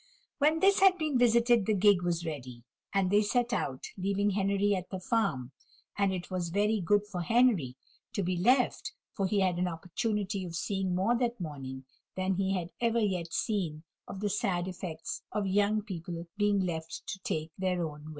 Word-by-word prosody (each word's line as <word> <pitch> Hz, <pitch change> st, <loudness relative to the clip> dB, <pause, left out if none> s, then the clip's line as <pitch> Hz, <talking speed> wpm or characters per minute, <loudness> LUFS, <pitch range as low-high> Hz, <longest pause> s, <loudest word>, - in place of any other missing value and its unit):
When 310 Hz, +3 st, +3 dB
this 390 Hz, +1 st, +5 dB
had 385 Hz, -2 st, +6 dB
been 305 Hz, -6 st, 0 dB
visited 235 Hz, -2 st, +4 dB
the 215 Hz, -, +3 dB
gig 200 Hz, -1 st, +5 dB
was 175 Hz, -1 st, -1 dB
ready, 130 Hz, -6 st, -6 dB, 0.3 s
and 195 Hz, -2 st, +1 dB
they 205 Hz, +1 st, +5 dB
set 240 Hz, +3 st, +1 dB
out, 130 Hz, -, -2 dB
leaving 200 Hz, +2 st, 0 dB
Henry 200 Hz, +1 st, +1 dB
at 185 Hz, -1 st, -5 dB
the 190 Hz, -, -4 dB
farm; 185 Hz, -, 0 dB, 0.4 s
and 200 Hz, -1 st, +2 dB
it 185 Hz, 0 st, -5 dB
was 180 Hz, -2 st, -2 dB
very 210 Hz, +4 st, +1 dB
good 205 Hz, +4 st, +2 dB
for 195 Hz, -4 st, -5 dB
Henry 195 Hz, -, +3 dB, 0.4 s
to 200 Hz, -, -1 dB
be 180 Hz, +1 st, 0 dB
left, 250 Hz, -, +2 dB, 0.2 s
for 195 Hz, -2 st, -1 dB
he 200 Hz, +1 st, +1 dB
had 180 Hz, -2 st, +1 dB
an 180 Hz, -, +1 dB
opportunity 195 Hz, +4 st, -2 dB
of 170 Hz, -2 st, -6 dB
seeing 190 Hz, 0 st, -1 dB
more 195 Hz, +7 st, +2 dB
that 240 Hz, -2 st, -1 dB
morning 135 Hz, -5 st, -6 dB, 0.3 s
than 185 Hz, 0 st, 0 dB
he 190 Hz, +1 st, 0 dB
had 175 Hz, -2 st, -3 dB
ever 235 Hz, 0 st, +2 dB
yet 185 Hz, -6 st, -1 dB
seen 170 Hz, -8 st, -1 dB, 0.2 s
of 195 Hz, -, -7 dB
the 205 Hz, -, 0 dB
sad 185 Hz, -4 st, 0 dB
effects 175 Hz, -3 st, -5 dB
of 210 Hz, -1 st, -1 dB
young 205 Hz, +2 st, +2 dB
people 170 Hz, -4 st, -6 dB
being 205 Hz, -1 st, +2 dB
left 165 Hz, -3 st, -4 dB
to 195 Hz, -, -5 dB
take 160 Hz, -3 st, -3 dB
their 180 Hz, -3 st, 0 dB
own 150 Hz, 0 st, -10 dB
way. -, -, -8 dB
190 Hz, 190 wpm, -30 LUFS, 175-210 Hz, 0.4 s, had